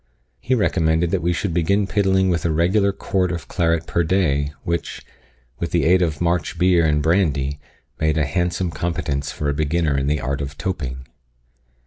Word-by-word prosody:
He 130 - 0
recommended 85 -6 +1
that 95 - 0
we 85 +2 +1
should 85 +1 -2
begin 100 +5 +2
piddling 95 -2 +2
with 85 - -1
a 85 - +1
regular 90 +6 +2
quart 95 -2 -1
of 85 -6 -5
claret 85 -2 0
per 85 - 0
day, 75 -5 +1
which, 85 0 -3 0.5
with 85 - -2
the 85 - +1
aid 90 +3 +4
of 80 -5 0
March 85 -2 -1
beer 90 -2 +4
and 75 -2 +2
brandy, 75 -5 +1 0.4
made 80 0 +1
a 75 - +2
handsome 90 +4 -1
competence 75 -4 -2
for 75 - -4
a 70 - +1
beginner 75 0 0
in 70 0 0
the 75 0 +1
art 70 +2 -2
of 70 +1 -6
toping. 65 -8 -4
85 Hz, 180 wpm, -21 LUFS, 75-90 Hz, 0.5 s, aid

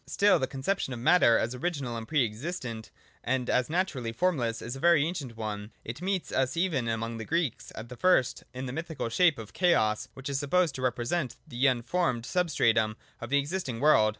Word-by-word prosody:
Still 205 +8 +4
the 130 - 0
conception 135 +2 -2
of 120 - -6
matter 120 -2 +5
as 120 - -1
original 135 -3 -3
and 115 -1 -6
pre 145 -5 +2
existent, 115 -1 -5 0.3
and 125 0 0
as 125 +1 +1
naturally 155 -9 -1
formless, 120 -6 0
is 120 +2 -5
a - - -7
very 170 -2 +5
ancient 145 -9 -5
one; 105 -1 -5
it 115 +7 -6
meets 190 -1 -2
us 130 +4 0
even 165 -9 +1
among 115 0 -2
the - - -4
Greeks, 165 -2 -2
at 120 +2 -8
first 180 -9 +3
in 130 +1 -6
the 125 - -5
mythical 160 -5 -4
shape 165 +5 +3
of 110 -2 -9
Chaos, 135 - +2
which 135 +1 -7
is 140 -1 -1
supposed 160 +2 +2
to 130 - -6
represent 125 +4 -1
the 130 -1 +1
unformed 125 0 0
substratum 115 -12 +1 0.2
of 120 - -7
the 140 - +3
existing 140 -4 -2
world. 135 -6 +5
130 Hz, 195 wpm, -29 LUFS, 115-165 Hz, 0.3 s, matter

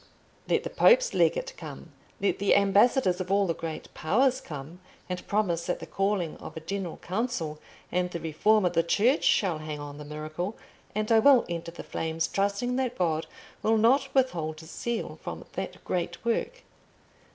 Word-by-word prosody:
Let - - +2
the - - -5
Pope's - - +5
legate - - +2
come, - - -9 0.3
let 200 - 0
the 200 - +4
ambassadors 200 0 +4
of 185 - -5
all 200 0 +4
the 170 - 0
great 160 -1 -6
Powers 255 - +2
come 150 +3 -8 0.3
and 180 0 -5
promise 175 -5 0
that - - 0
the - - -8
calling 195 -4 -1
of - - -9
a - - -2
General 180 +1 -4
Council 185 -6 -3 0.3
and 180 0 +1
the 170 - -5
reform 195 +7 +2
of 180 - +1
the 165 - +4
Church 215 - +2
shall 180 -6 +3
hang 155 -1 -5
on 145 0 -8
the - - -7
miracle, 155 +7 -5 0.4
and 215 +1 -1
I 225 - +7
will 260 +1 +6
enter 170 -1 -4
the 170 - -9
flames, 160 0 -2
trusting 200 +6 0
that 255 -2 -1
God 160 -3 0 0.3
will 225 +1 +3
not 260 +5 +4
withhold 165 -12 +1
His 160 - -12
seal 235 -1 -3
from - - -6
that - - -5
great 175 +2 -3
work. 235 - -1
190 Hz, 180 wpm, -28 LUFS, 165-230 Hz, 0.4 s, I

